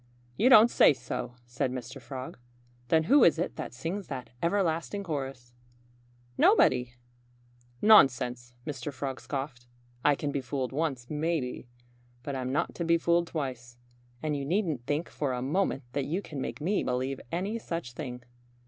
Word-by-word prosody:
"You 240 - +4
don't 235 -2 +8
say - - +6
so!" 125 -2 -5
said 125 +2 -2
Mr. 130 +1 -6
Frog. 130 -1 -7 0.5
"Then 160 +4 +4
who 265 - +6
is 165 - +5
it 175 - -2
that - - -5
sings 165 +10 -4
that 130 -2 -6
everlasting 175 +2 0
chorus?" 135 -7 -5 0.9
"Nobody!" 125 0 +4 0.9
"Nonsense!" 125 - +5
Mr. 145 -1 -4
Frog 135 -1 -5
scoffed. 135 -3 -5 0.4
"I 145 - +5
can 145 +1 -3
be 140 - -2
fooled 130 0 -3
once, 135 -4 -2
maybe. 150 -5 -2 0.6
But 140 - -4
I'm 130 -1 -2
not 140 - 0
to 170 - -3
be 170 0 +4
fooled 170 +1 +2
twice. 125 -6 -5 0.5
And 155 -1 0
you 140 - -3
needn't 155 - -1
think 150 +4 -1
for 140 -3 -2
a 125 - -3
moment 145 0 0
that 140 -2 -1
you 180 +6 -2
can 145 -4 -6
make - - -5
me 195 +6 +1
believe 130 +2 -2
any 195 +7 -2
such 165 - -5
thing." 125 -3 -6
140 Hz, 160 wpm, -29 LUFS, 125-165 Hz, 0.9 s, don't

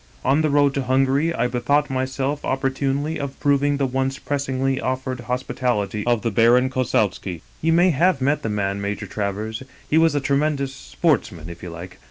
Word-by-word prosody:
On 140 +4 +3
the 155 - +1
road 145 -1 +3
to 140 - -1
Hungary 135 +4 +2
I 125 -7 0
bethought 140 +4 +1
myself 130 +2 -2
opportunely 135 +3 -1
of 140 -1 -5
proving 145 0 +2
the 140 - +1
once 135 +1 -1
pressingly 135 -2 -1
offered 130 0 -2
hospitality 120 -4 -2
of 120 -2 +2
the 115 - 0
Baron 120 +5 +4
Kossowski. 100 -8 -1
" - - -30
You 165 - +2
may 175 +2 +5
have 170 +1 +2
met 140 +3 +1
the 110 - -3
man, 100 -1 -1
Major 100 +1 -3
Travers; 105 +3 -3 0.3
he 155 - +3
was 165 -2 +3
a - - +3
tremendous 140 0 0
sportsman, 110 - -1
if 85 - -11
you 90 - -7
like. 85 +2 -9
130 Hz, 185 wpm, -22 LUFS, 115-145 Hz, 0.3 s, may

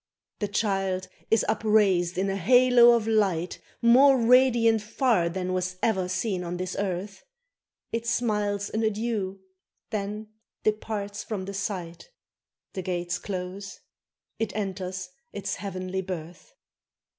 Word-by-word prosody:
The 205 - -1
child 195 -3 -1 0.2
is 225 - +3
upraised 195 -5 +2
in 190 +1 +1
a 195 - -1
halo 245 +4 +6
of 230 -2 0
light 195 -6 +1 0.2
More 265 +4 +7
radiant 235 -2 +4
far 215 -5 +1
than 185 +1 -3
was 185 0 -2
e'er 190 -5 +1
seen 185 0 -1
on 175 0 -4
this 185 0 -4
earth; 195 0 -3 0.7
It 230 0 -3
smiles 210 -4 0
an 220 - -1
adieu! 215 -3 -2 0.5
then 210 0 -4 0.3
departs 210 -1 -2
from 200 -4 -4
the 200 - -6
sight; 185 - -5 0.6
The 190 - -3
gates 175 -1 -2
close: 195 +1 -6 0.6
it 225 -2 -2
enters 190 -2 -4 0.3
its 200 -1 -3
heavenly 190 -1 -4
birth! 180 - -7
200 Hz, 125 wpm, -26 LUFS, 185-220 Hz, 0.7 s, More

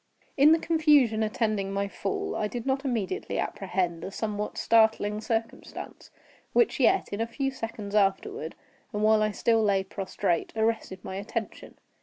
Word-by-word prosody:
In 290 +2 +6
the 325 - +6
confusion 300 -9 +3
attending 215 -2 -1
my 200 0 -1
fall, 195 0 -3
I 210 - 0
did 235 +2 -6
not 270 +1 0
immediately 235 -8 -2
apprehend 185 -4 -2
a - - -4
somewhat 210 +1 -4
startling 220 -2 +3
circumstance, 225 0 -5 0.4
which 475 - +3
yet, 385 - +3
in 205 +2 -3
a 230 - 0
few 270 +3 -2
seconds 225 -5 -6
afterward, 210 - 0 0.4
and 210 0 -1
while 215 0 +5
I 215 - +2
still 225 +2 +2
lay 200 -2 +2
prostrate, 190 -2 -2
arrested 220 -4 -1
my 190 - -5
attention. 220 +2 -5
215 Hz, 155 wpm, -27 LUFS, 200-235 Hz, 0.4 s, In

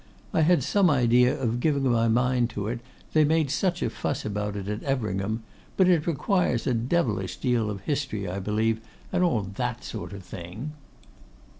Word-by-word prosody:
I 170 - +3
had 170 +2 +4
some 200 -3 +3
idea 125 -2 +4
of 120 -2 0
giving 140 0 +1
my 115 -1 +3
mind 125 +1 +2
to 100 0 -1
it, 120 +2 -2 0.3
they 155 - +5
made 155 -2 +2
such 175 +3 0
a - - +1
fuss 145 - -3
about 105 -1 -2
it 100 -1 -5
at 105 +1 -3
Everingham; 110 -5 -1 0.3
but 190 - +5
it 175 -4 +3
requires 170 - +1
a 130 - +2
devilish 115 - 0
deal 120 -4 +1
of 100 -2 -5
history, 135 -6 -2
I 90 +2 -3
believe, 110 +3 0 0.3
and 180 -1 +3
all 140 - +2
that 120 +5 -3
sort 110 -2 -6
of 100 -2 -8
thing. 90 - -7
120 Hz, 180 wpm, -26 LUFS, 105-150 Hz, 0.3 s, they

